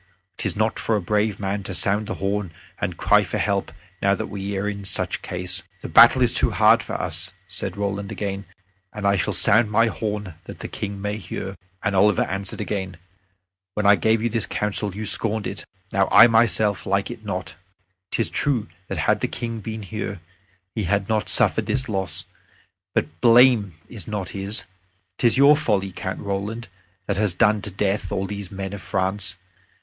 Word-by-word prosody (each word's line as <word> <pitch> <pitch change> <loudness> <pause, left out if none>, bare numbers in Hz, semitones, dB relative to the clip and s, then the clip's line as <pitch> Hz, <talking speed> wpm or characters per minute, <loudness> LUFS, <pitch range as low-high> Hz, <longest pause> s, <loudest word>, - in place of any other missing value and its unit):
'Tis - - -2
not 110 +1 0
for 115 - 0
a - - +1
brave 105 +2 0
man 100 0 -2
to 95 -1 -5
sound 100 +4 +1
the - - -3
horn 100 -2 -2 0.3
and - - -3
cry - - +4
for - - -3
help 100 -1 -1 0.3
now 100 0 +3
that - - -4
we 100 0 -4
are 100 +2 -1
in 100 -1 -4
such 95 - -1
case." 90 -1 -2 0.2
"The - - -6
battle 125 +2 +7
is 120 - +3
too - - +3
hard - - +5
for - - -7
us," 90 +4 -1
said 95 +2 -3
Roland 100 0 -3
again, 100 -1 -4 0.5
"and 105 -1 -6
I 100 0 +4
shall 95 - 0
sound 110 +2 +4
my 115 +2 +4
horn, 105 -4 -3
that - - -9
the - - -5
King 100 -1 -5
may 105 +1 -3
hear." 95 -1 -6 0.3
And 105 -3 0
Oliver 100 0 +4
answered 95 +1 -4
again, 95 -4 -4 0.8
"When 105 - -1
I 100 - +8
gave 110 +1 +1
you 120 - +1
this 115 -2 -1
counsel, 105 -1 -2
you 110 +1 -4
scorned 110 0 +2
it. 95 -4 -6 0.3
Now 95 0 +2
I 110 - +9
myself 110 -4 +3
like 100 +3 0
it 115 -2 -9
not. 95 -3 -4 0.6
'Tis 115 - -1
true 125 - 0 0.2
that - - -4
had - - +2
the - - -1
King 115 -1 -5
been 110 +1 -6
here, 100 -1 -5 0.6
we 110 - -1
had 100 +2 0
not 110 -1 0
suffered - - +4
this 130 0 0
loss. 95 -4 -2 0.7
But - - +2
the - - -25
blame 115 -6 +6
is 105 -8 -9
not 100 -4 -4
his. 100 0 -1 0.6
'Tis 120 +1 +4
your 140 +2 +7
folly, 105 -10 0
Count 95 +1 -5
Roland, 100 +3 -4 0.4
that 100 -2 -2
has 105 -4 0
done 105 +1 +3
to 105 - -5
death 100 +1 -1
all 95 - -1
these 100 -1 -6
men 95 0 -5
of 100 - -6
France. 95 0 -1
100 Hz, 195 wpm, -23 LUFS, 95-110 Hz, 0.8 s, I